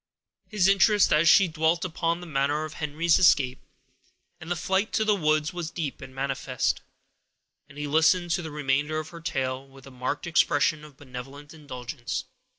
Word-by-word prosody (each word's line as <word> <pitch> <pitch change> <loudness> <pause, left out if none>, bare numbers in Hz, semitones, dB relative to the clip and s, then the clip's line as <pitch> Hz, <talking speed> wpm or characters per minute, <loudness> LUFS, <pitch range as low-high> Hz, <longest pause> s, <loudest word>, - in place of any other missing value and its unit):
His 210 -4 +2
interest, 200 +1 +4
as 160 +2 +4
she 195 0 +6
dwelt 160 +2 0
upon 170 0 -2
the - - -8
manner 145 0 0
of 155 - -8
Henry's 160 +2 +1
escape, 135 -7 +4 0.8
and 160 0 -10
the 175 - 0
flight 190 +4 0
to 220 - +1
the 215 - +4
woods, 155 -3 +1
was 175 -3 -4
deep 160 -5 -5
and 130 - -11
manifest, 135 -1 -1 0.9
and 140 - -15
he 150 - -3
listened 165 +4 +3
to 175 - +1
the 160 - -6
remainder 150 +1 -1
of 155 0 -4
her 170 -1 -11
tale 135 -4 -3
with 135 0 -16
a 135 - -12
marked 130 +3 -4
expression 155 -2 +2
of 150 -3 -14
benevolent 140 +2 -10
indulgence. 130 -4 -6
155 Hz, 175 wpm, -26 LUFS, 135-170 Hz, 0.9 s, she